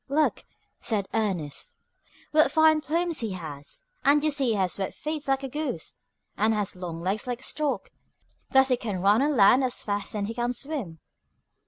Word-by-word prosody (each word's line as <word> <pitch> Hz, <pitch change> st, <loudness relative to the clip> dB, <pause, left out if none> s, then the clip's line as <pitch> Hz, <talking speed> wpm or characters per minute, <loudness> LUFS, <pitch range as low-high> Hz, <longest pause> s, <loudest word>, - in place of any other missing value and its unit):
"Look," 300 Hz, +2 st, +1 dB, 0.3 s
said 205 Hz, -4 st, -1 dB
Ernest, 185 Hz, -10 st, -2 dB, 0.6 s
"what 305 Hz, -2 st, +5 dB
fine 315 Hz, 0 st, +5 dB
plumes 335 Hz, +2 st, 0 dB
he 220 Hz, -4 st, -2 dB
has, 160 Hz, -, -7 dB, 0.2 s
and 290 Hz, +1 st, +4 dB
you 310 Hz, -, +3 dB
see 280 Hz, -2 st, +1 dB
he 235 Hz, -, +2 dB
has 190 Hz, -1 st, -1 dB
web 190 Hz, -, -2 dB
feet 305 Hz, -1 st, -4 dB
like 270 Hz, 0 st, +1 dB
a -, -, -2 dB
goose, 270 Hz, -, -4 dB, 0.4 s
and 220 Hz, +2 st, +2 dB
has 205 Hz, -3 st, -2 dB
long 170 Hz, -2 st, -6 dB
legs 195 Hz, +7 st, -1 dB
like 245 Hz, 0 st, -3 dB
a -, -, -7 dB
stork: 300 Hz, -2 st, -2 dB, 0.6 s
thus 265 Hz, 0 st, +5 dB
he 250 Hz, -, +3 dB
can 210 Hz, -6 st, -3 dB
run 205 Hz, +4 st, +5 dB
on 290 Hz, -1 st, +1 dB
land 220 Hz, +6 st, +6 dB
as 255 Hz, -2 st, -2 dB
fast 205 Hz, 0 st, -2 dB
as 205 Hz, -1 st, -1 dB
he 225 Hz, -, -4 dB
can 240 Hz, +1 st, -1 dB
swim." 250 Hz, -, -4 dB
240 Hz, 190 wpm, -27 LUFS, 200-290 Hz, 0.6 s, land